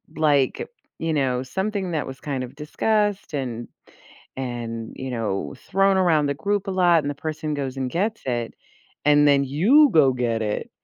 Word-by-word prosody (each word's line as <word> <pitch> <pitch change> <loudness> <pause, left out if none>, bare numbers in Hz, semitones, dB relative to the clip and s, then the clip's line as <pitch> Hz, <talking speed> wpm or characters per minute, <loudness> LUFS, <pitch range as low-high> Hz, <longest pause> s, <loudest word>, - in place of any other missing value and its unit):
like, 145 -4 +1 0.3
you 165 -1 -1
know, 130 -4 0
something 190 +6 -3
that 155 -3 -1
was 135 0 -8
kind 135 -3 -3
of 125 +2 -9
discussed 205 +6 -1
and 120 -5 -4 0.7
and, 120 -3 -5
you 130 0 -5
know, 115 -4 -3
thrown 195 0 +3
around 160 -5 +3
the 140 - 0
group 200 +6 -1
a - - -2
lot 175 -3 +4
and 145 - -2
the - - -4
person 155 +1 -4
goes 135 -2 -4
and 130 -1 -2
gets 210 - -1
it, 120 -2 -2 0.5
and 145 0 +5
then 140 -1 +4
you 220 - +5
go 140 -5 +5
get 120 -2 -1
it, 105 -1 -3
145 Hz, 175 wpm, -23 LUFS, 130-180 Hz, 0.7 s, and